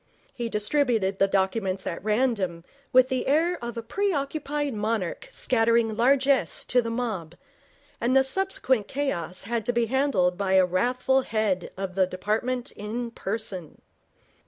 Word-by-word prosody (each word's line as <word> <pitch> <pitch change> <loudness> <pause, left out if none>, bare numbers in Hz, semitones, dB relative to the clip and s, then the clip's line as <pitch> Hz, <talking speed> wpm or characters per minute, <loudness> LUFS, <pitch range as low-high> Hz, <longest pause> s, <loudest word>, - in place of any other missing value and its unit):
He 235 -2 -3
distributed 210 -3 +1
the 195 - +5
documents 190 0 0
at 170 - -4
random 210 -6 0 0.3
with 255 -1 +5
the 260 -2 -1
air 325 +3 +2
of 235 -1 -5
a 230 - -4
preoccupied 290 - -1
monarch 215 - -2
scattering 230 - +2
largess 270 +3 +2
to 250 - +3
the 230 - -4
mob, 215 -9 -3 0.7
and 250 +3 +3
the 265 - +6
subsequent 265 - 0
chaos 185 - -3
had 230 +2 -2
to - - +3
be 235 0 +2
handled 225 -8 +1
by 190 -1 0
a 190 -1 +6
wrathful 250 +8 +1
head 215 -7 -1
of 190 -1 -4
the 190 0 +2
department 225 +8 -2
in 230 +3 -5
person. 195 -7 -4
230 Hz, 145 wpm, -26 LUFS, 195-260 Hz, 0.7 s, the